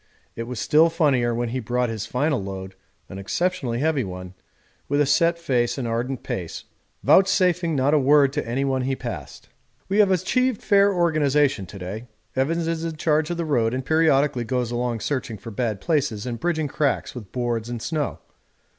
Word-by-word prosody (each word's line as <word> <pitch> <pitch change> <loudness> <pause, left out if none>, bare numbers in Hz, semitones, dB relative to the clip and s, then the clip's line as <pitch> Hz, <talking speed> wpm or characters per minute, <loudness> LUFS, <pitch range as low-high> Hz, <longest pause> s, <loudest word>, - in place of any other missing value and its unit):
It 115 0 -5
was 125 -2 -5
still 160 +8 +4
funnier 140 -8 +2
when 120 0 -1
he 130 +3 -2
brought 125 +1 -1
his 110 -3 -4
final 140 -3 0
load 95 -1 -6 0.3
(an 95 - -8
exceptionally 135 - -1
heavy 155 -3 +1
one) 90 -1 -7 0.6
with 145 +1 +1
a 145 - +4
set 165 +4 +3
face 125 -7 0
and 125 -3 -2
ardent 120 +3 -2
pace, 85 -3 -5 0.4
vouchsafing 180 -3 +3
not 140 +2 +2
a 155 - +5
word 140 0 +4
to - - -2
anyone 135 +1 0
he 135 +1 -1
passed. - - -7 0.4
We 200 +2 +1
have 205 -2 +6
achieved 250 +6 +1
fair 200 -1 +4
organisation 150 - +2
to 100 - -10
day. 100 +6 -6 0.3
Evans 165 +5 0
is 165 -1 -2
in 165 -1 -3
charge 155 0 +1
of 175 - -2
the 170 - -2
road 120 -6 +1
and 130 0 -4
periodically 145 -5 +2
goes 125 0 -2
along 120 -2 -2
searching 125 -4 -3
for 105 +4 -9
bad 110 -2 -2
places 130 - -1
and 120 -2 -4
bridging 160 0 0
cracks 145 0 -1
with 110 -6 -9
boards 120 -2 -2
and 120 -1 -4
snow. 150 +4 -2
135 Hz, 185 wpm, -23 LUFS, 120-160 Hz, 0.6 s, have